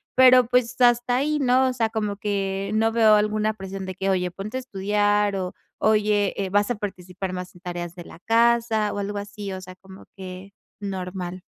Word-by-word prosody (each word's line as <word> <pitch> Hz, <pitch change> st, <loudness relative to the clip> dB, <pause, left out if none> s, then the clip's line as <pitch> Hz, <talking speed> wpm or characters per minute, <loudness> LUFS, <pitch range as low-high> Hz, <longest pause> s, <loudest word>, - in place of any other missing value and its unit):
Pero, 255 Hz, -1 st, +7 dB
pues, 250 Hz, +1 st, 0 dB
hasta 240 Hz, 0 st, +4 dB
ahí, 300 Hz, +3 st, 0 dB
¿no? 260 Hz, -1 st, +3 dB
O -, -, -2 dB
sea, 230 Hz, -3 st, 0 dB
como 210 Hz, -2 st, -2 dB
que 195 Hz, -1 st, -2 dB
no 225 Hz, +1 st, +2 dB
veo 220 Hz, -2 st, +5 dB
alguna 215 Hz, +1 st, +1 dB
presión 195 Hz, -1 st, -6 dB
de 185 Hz, -, -5 dB
que: 195 Hz, +1 st, -2 dB
"Oye 180 Hz, -1 st, 0 dB
ponte 205 Hz, +7 st, -6 dB
a -, -, -1 dB
estudiar, 205 Hz, -2 st, +1 dB
o, 185 Hz, -1 st, -4 dB, 0.2 s
oye, 210 Hz, -2 st, +2 dB
eh, 195 Hz, -2 st, -2 dB
vas 205 Hz, +2 st, +2 dB
a -, -, 0 dB
participar 185 Hz, -2 st, -6 dB
más 180 Hz, 0 st, -6 dB
en 175 Hz, -, -16 dB
tareas 175 Hz, -1 st, -5 dB
de 175 Hz, -2 st, -9 dB
la -, -, -13 dB
casa", 230 Hz, -1 st, +2 dB
o 205 Hz, -, -4 dB
algo 205 Hz, +1 st, -3 dB
así. 205 Hz, 0 st, -6 dB
O 185 Hz, -, -6 dB
sea, 185 Hz, 0 st, -10 dB
como 190 Hz, 0 st, -15 dB
que 190 Hz, +1 st, -9 dB, 0.3 s
normal. 185 Hz, -2 st, -5 dB
205 Hz, 205 wpm, -24 LUFS, 190-225 Hz, 0.3 s, Pero